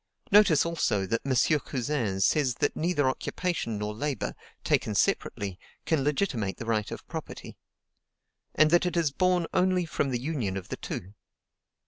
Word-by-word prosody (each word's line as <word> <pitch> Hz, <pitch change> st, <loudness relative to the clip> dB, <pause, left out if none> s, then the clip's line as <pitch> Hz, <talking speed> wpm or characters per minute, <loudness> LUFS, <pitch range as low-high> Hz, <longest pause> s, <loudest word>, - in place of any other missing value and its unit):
Notice 195 Hz, -8 st, +6 dB
also 120 Hz, -12 st, 0 dB
that 115 Hz, +4 st, -1 dB
M. 135 Hz, +3 st, +2 dB
Cousin 120 Hz, -8 st, -2 dB
says 130 Hz, +3 st, +2 dB
that 145 Hz, -, 0 dB
neither 155 Hz, -4 st, +1 dB
occupation 130 Hz, -3 st, -2 dB
nor 105 Hz, +1 st, -3 dB
labor, 140 Hz, +1 st, -3 dB, 0.3 s
taken -, -, +1 dB
separately, 95 Hz, -3 st, 0 dB, 0.3 s
can 155 Hz, -4 st, +1 dB
legitimate 135 Hz, -, -1 dB
the -, -, -6 dB
right 110 Hz, -2 st, 0 dB
of -, -, -8 dB
property; -, -, -7 dB, 1.0 s
and 155 Hz, 0 st, +5 dB
that 175 Hz, +1 st, +4 dB
it 175 Hz, -, -2 dB
is 160 Hz, -4 st, +2 dB
born 180 Hz, +2 st, +2 dB
only 180 Hz, -1 st, +2 dB
from 145 Hz, -3 st, -1 dB
the 125 Hz, -2 st, -1 dB
union 125 Hz, -9 st, -2 dB
of 95 Hz, -, -7 dB
the -, -, -4 dB
two. 95 Hz, +3 st, -6 dB
140 Hz, 155 wpm, -28 LUFS, 110-170 Hz, 1.0 s, Notice